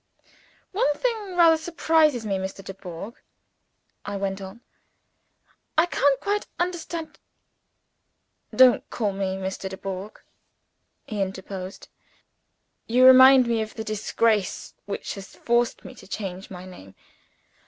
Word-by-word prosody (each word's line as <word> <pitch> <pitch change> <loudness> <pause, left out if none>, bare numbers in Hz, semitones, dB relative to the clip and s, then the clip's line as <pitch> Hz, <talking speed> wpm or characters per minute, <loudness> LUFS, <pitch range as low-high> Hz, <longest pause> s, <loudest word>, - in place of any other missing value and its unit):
"One 385 -7 +1
thing 435 -3 -2
rather 335 -2 +6
surprises 315 -6 +2
me, 195 -2 -1
Mr. 190 +1 -6
Dubourg," 190 +2 -8 0.9
I 205 0 -4
went 195 0 -3
on. 190 +5 -10 1.2
"I 320 - +6
can't 285 -5 +2
quite 410 +5 -2
understand 340 -2 -4 0.7
" - - -23
"Don't 250 - +2
call 210 -4 -1
me 190 -1 -2
Mr. 190 0 -4
Dubourg," 190 +1 -7 0.9
he 210 -2 -4
interposed. 190 0 -6 1.0
"You 250 +3 +4
remind 260 0 +9
me 230 -1 0
of 215 0 -6
the 220 - -4
disgrace 215 -1 0
which 200 - -4
has 195 -1 -10
forced 240 0 0
me - - -9
to - - -15
change 190 -2 -6
my 185 -1 -9
name. 95 - -13
215 Hz, 120 wpm, -25 LUFS, 190-290 Hz, 1.2 s, remind